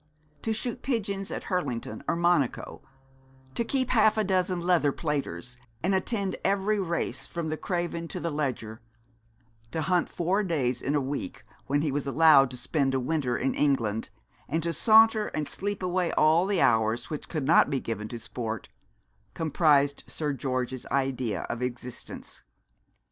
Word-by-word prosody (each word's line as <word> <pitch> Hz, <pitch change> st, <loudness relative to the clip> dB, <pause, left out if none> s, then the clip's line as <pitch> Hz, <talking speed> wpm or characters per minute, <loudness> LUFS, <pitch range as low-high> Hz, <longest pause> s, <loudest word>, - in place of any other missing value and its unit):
To 225 Hz, -, -1 dB
shoot 240 Hz, +3 st, -3 dB
pigeons 200 Hz, -6 st, -2 dB
at -, -, -4 dB
Hurlington 125 Hz, -, -3 dB
or -, -, +1 dB
Monaco, 170 Hz, -6 st, +1 dB, 0.7 s
to 235 Hz, -, 0 dB
keep 260 Hz, +1 st, 0 dB
half 220 Hz, -2 st, +4 dB
a 215 Hz, -, +3 dB
dozen 185 Hz, -2 st, +1 dB
leather 170 Hz, -4 st, +3 dB
platers, 135 Hz, -, -3 dB, 0.3 s
and 190 Hz, +3 st, +2 dB
attend 195 Hz, 0 st, -1 dB
every 200 Hz, +2 st, +1 dB
race 170 Hz, -3 st, -2 dB
from 170 Hz, -2 st, -4 dB
the 155 Hz, -, -1 dB
Craven 175 Hz, -1 st, -3 dB
to -, -, -5 dB
the 170 Hz, -, -2 dB
Leger, 125 Hz, -6 st, -3 dB, 0.9 s
to 160 Hz, +7 st, -2 dB
hunt 180 Hz, 0 st, +1 dB
four 180 Hz, +4 st, 0 dB
days 135 Hz, -, 0 dB
a 145 Hz, +2 st, +1 dB
week, 135 Hz, -1 st, -4 dB, 0.2 s
when 145 Hz, +2 st, +1 dB
he 150 Hz, -, 0 dB
was 140 Hz, 0 st, -2 dB
allowed 140 Hz, -2 st, +6 dB
to 125 Hz, -, -7 dB
spend 135 Hz, +1 st, 0 dB
a -, -, +2 dB
winter 130 Hz, -2 st, 0 dB
in 135 Hz, -, 0 dB
England, 115 Hz, -7 st, 0 dB, 0.4 s
and 160 Hz, +2 st, 0 dB
to 170 Hz, 0 st, -1 dB
saunter 220 Hz, +4 st, +5 dB
and 150 Hz, -1 st, -2 dB
sleep 205 Hz, -1 st, -4 dB
away 180 Hz, -1 st, 0 dB
all 160 Hz, +4 st, +4 dB
the 200 Hz, -3 st, +1 dB
hours 115 Hz, +2 st, +2 dB
which 150 Hz, -, -5 dB
could 155 Hz, -5 st, -2 dB
not 160 Hz, +1 st, +5 dB
be 140 Hz, -2 st, 0 dB
given 110 Hz, -3 st, -4 dB
to 120 Hz, +1 st, -6 dB
sport, 115 Hz, -1 st, -5 dB, 0.7 s
comprised 145 Hz, -3 st, +2 dB
Sir 150 Hz, -2 st, -2 dB
George's 130 Hz, -1 st, -3 dB
idea 130 Hz, -4 st, -1 dB
of 120 Hz, +1 st, -5 dB
existence. 125 Hz, -1 st, -6 dB
155 Hz, 160 wpm, -28 LUFS, 130-185 Hz, 0.9 s, allowed